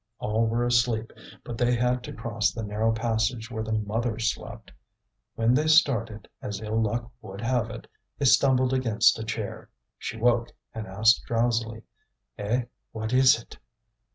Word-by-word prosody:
All 110 Hz, +2 st, 0 dB
were 120 Hz, +2 st, 0 dB
asleep, 120 Hz, -2 st, +1 dB, 0.3 s
but 115 Hz, -, -7 dB
they 120 Hz, 0 st, +3 dB
had 125 Hz, +1 st, +1 dB
to -, -, -7 dB
cross 115 Hz, -1 st, -1 dB
the 115 Hz, -, -6 dB
narrow 105 Hz, +2 st, 0 dB
passage 115 Hz, +1 st, -1 dB
where 110 Hz, -2 st, -3 dB
the 110 Hz, 0 st, -4 dB
mother 110 Hz, +2 st, -1 dB
slept. 110 Hz, -, -4 dB, 0.6 s
When 115 Hz, +2 st, +2 dB
they 150 Hz, +4 st, +2 dB
started, 115 Hz, -9 st, +2 dB
as 105 Hz, 0 st, -5 dB
ill 110 Hz, +1 st, -1 dB
luck 120 Hz, +3 st, -2 dB
would 100 Hz, -2 st, -9 dB
have 120 Hz, -1 st, 0 dB
it, 115 Hz, -, -8 dB, 0.3 s
they 140 Hz, -, -1 dB
stumbled 130 Hz, -1 st, +4 dB
against 115 Hz, -4 st, +3 dB
a -, -, -4 dB
chair. 110 Hz, -2 st, -5 dB, 0.3 s
She -, -, -5 dB
woke 120 Hz, 0 st, +1 dB, 0.2 s
and 110 Hz, -2 st, -6 dB
asked 110 Hz, +5 st, +3 dB
drowsily: 115 Hz, -1 st, -1 dB, 0.6 s
"Eh! 115 Hz, +5 st, 0 dB, 0.3 s
what 110 Hz, +1 st, -4 dB
is 130 Hz, -2 st, +6 dB
it?" 115 Hz, -, -14 dB
115 Hz, 160 wpm, -26 LUFS, 110-120 Hz, 0.6 s, is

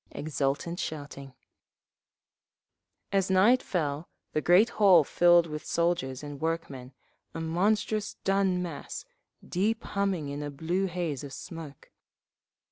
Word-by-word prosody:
Exultant 150 Hz, +3 st, -2 dB
shouting…. 145 Hz, -3 st, -6 dB, 1.8 s
As 195 Hz, -1 st, +1 dB
night 205 Hz, +7 st, +5 dB
fell 155 Hz, -3 st, -2 dB, 0.2 s
the 155 Hz, -, +1 dB
great 185 Hz, +8 st, +5 dB
hall 185 Hz, -6 st, +7 dB
filled 175 Hz, +3 st, +5 dB
with 150 Hz, -2 st, -6 dB
soldiers 165 Hz, -6 st, -1 dB
and 145 Hz, -1 st, -8 dB
workmen, 150 Hz, -6 st, -3 dB, 0.4 s
a -, -, -3 dB
monstrous 205 Hz, +5 st, 0 dB
dun 195 Hz, -2 st, +1 dB
mass, 165 Hz, -5 st, -6 dB, 0.4 s
deep 215 Hz, +5 st, 0 dB
humming 195 Hz, -7 st, -1 dB
in 140 Hz, +1 st, -5 dB
a 145 Hz, -, -4 dB
blue 170 Hz, +7 st, -1 dB
haze 170 Hz, -7 st, -3 dB
of 140 Hz, -1 st, -8 dB
smoke. 155 Hz, -4 st, -9 dB
170 Hz, 120 wpm, -28 LUFS, 145-190 Hz, 1.8 s, hall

